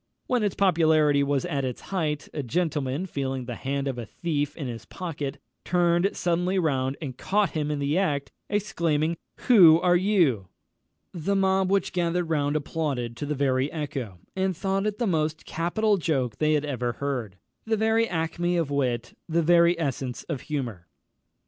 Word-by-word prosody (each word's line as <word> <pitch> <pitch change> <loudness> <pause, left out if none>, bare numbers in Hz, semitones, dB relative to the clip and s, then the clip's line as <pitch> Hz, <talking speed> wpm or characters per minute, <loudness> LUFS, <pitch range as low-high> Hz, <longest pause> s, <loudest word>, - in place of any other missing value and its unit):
When 250 -2 +1
its 205 -3 0
popularity 160 -6 +4
was 140 -1 0
at 140 -1 -1
its 125 -2 -3
height, 155 -6 -1
a 150 - -2
gentleman, 150 +1 -1
feeling 135 -6 -3
the 120 - -5
hand 140 +3 -3
of 130 -3 -3
a 120 - -5
thief 145 - -2
in 150 - -4
his 115 -3 -6
pocket, 150 -5 -5 0.3
turned 175 +2 +2
suddenly 180 +2 0
round 135 -6 0
and 135 -6 -5
caught 205 +8 +1
him 150 -3 -2
in 150 - -1
the 145 +5 +1
act, 145 -7 -1 0.2
exclaiming, 170 -6 0 0.3
"Who 175 -10 +7
are 175 0 +3
you?" 175 - +2 0.7
The 185 +3 -1
mob 190 -1 +2
which 195 -1 +1
gathered 175 -1 0
round 145 -1 +1
applauded 145 -6 -2
to 145 - -4
the 150 - -1
very 135 0 +1
echo, 135 - -4 0.2
and 190 -2 0
thought 195 +1 0
it 210 -1 -2
the 240 - 0
most 160 -4 -1
capital 205 +6 +1
joke 135 - -1
they 155 0 +3
had 150 -1 +1
ever 125 -4 -2
heard, 125 -9 -3 0.3
the 220 -1 +1
very 220 +1 +2
acmé 175 +1 -1
of 155 -4 -1
wit, 125 -4 -1
the 165 +1 +2
very 170 +1 +5
essence 135 -5 -3
of 150 -6 -4
humour. 120 - -4
155 Hz, 175 wpm, -26 LUFS, 140-180 Hz, 0.7 s, Who